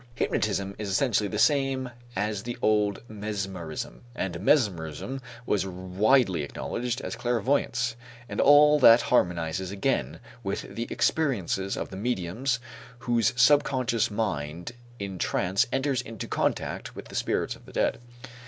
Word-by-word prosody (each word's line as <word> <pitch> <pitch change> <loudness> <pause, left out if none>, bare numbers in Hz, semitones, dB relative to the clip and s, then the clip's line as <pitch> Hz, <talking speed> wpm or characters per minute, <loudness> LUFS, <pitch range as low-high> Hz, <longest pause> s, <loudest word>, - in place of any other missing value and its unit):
Hypnotism 100 -4 -1
is 105 -2 -3
essentially 105 0 +1
the 105 - -3
same 135 -1 +2 0.2
as 105 0 -1
the 120 +3 -5
old 105 -2 +1
mesmerism, 95 -6 -5
and 90 -3 -3
mesmerism 100 - 0 0.2
was 105 - +1
widely 95 - +2
acknowledged 120 - -3
as - - -4
clairvoyance, 120 0 0 0.3
and - - -1
all 150 +1 +7
that 120 -3 +8
harmonizes 90 -3 +1
again 80 -6 -1 0.2
with 100 - -2
the 115 +3 -4
experiences 100 - 0
of - - -4
the 95 - -8
mediums 115 +3 -1 0.4
whose 120 +1 +1
subconscious 125 -3 +3
mind 85 -4 -3 0.3
in 100 -4 -5
trance 95 +10 +1
enters 135 -1 0
into 115 -4 -7
contact - - -2
with - - -9
the - - -10
spirits - - -1
of - - -19
the - - -11
dead. - - 0
105 Hz, 135 wpm, -27 LUFS, 95-125 Hz, 0.4 s, that